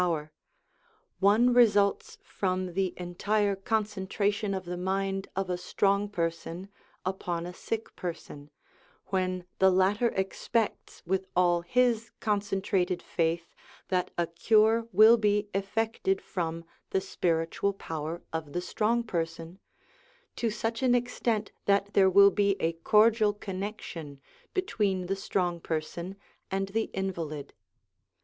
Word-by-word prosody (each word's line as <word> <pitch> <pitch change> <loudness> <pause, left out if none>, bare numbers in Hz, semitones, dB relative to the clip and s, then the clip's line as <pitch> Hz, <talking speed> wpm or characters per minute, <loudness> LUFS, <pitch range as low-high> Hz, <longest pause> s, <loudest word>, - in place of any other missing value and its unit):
1 - - +3
power 155 -3 -2 0.9
one 220 +5 +5
results 205 -5 +3
from 185 -2 -2
the 190 0 -1
entire 200 +3 0
concentration 205 0 -1
of 190 -1 -5
the 175 +1 -4
mind 195 +1 -1
of 195 0 -1
a 180 -1 -2
strong 200 +2 +1
person 170 0 -3 0.4
upon 175 -2 -2
a 180 - -6
sick 225 +4 -5
person, 155 -4 -7 0.6
when 185 -2 -1
the 190 - +6
latter 190 +5 +3
expects 200 +3 -2
with 190 +2 -1
all 175 -1 +3
his 230 +4 +1
concentrated 195 -3 0
faith 165 0 -2 0.4
that 185 -1 0
a 170 - +2
cure 220 +6 +3
will 220 +4 +8
be 210 -1 +1
effected 195 0 0
from 165 -2 -4 0.2
the 190 - +1
spiritual 170 +1 0
power 165 -3 -5
of 155 -3 -4
the 175 - -1
strong 220 +6 0
person, 165 -2 -4 0.8
to 230 - 0
such 225 +2 -3
an 250 -2 +4
extent 235 -3 -1
that 200 0 +2
there 190 -1 +5
will 200 +1 +7
be 200 0 +2
a 165 +1 +1
cordial 215 +5 +4
connection 185 -8 -6 0.4
between 205 - 0
the 195 +2 -1
strong 180 -3 -1
person 170 +3 -4 0.3
and 195 0 -1
the 220 +2 0
invalid. 165 -7 -4
195 Hz, 125 wpm, -29 LUFS, 175-210 Hz, 0.9 s, will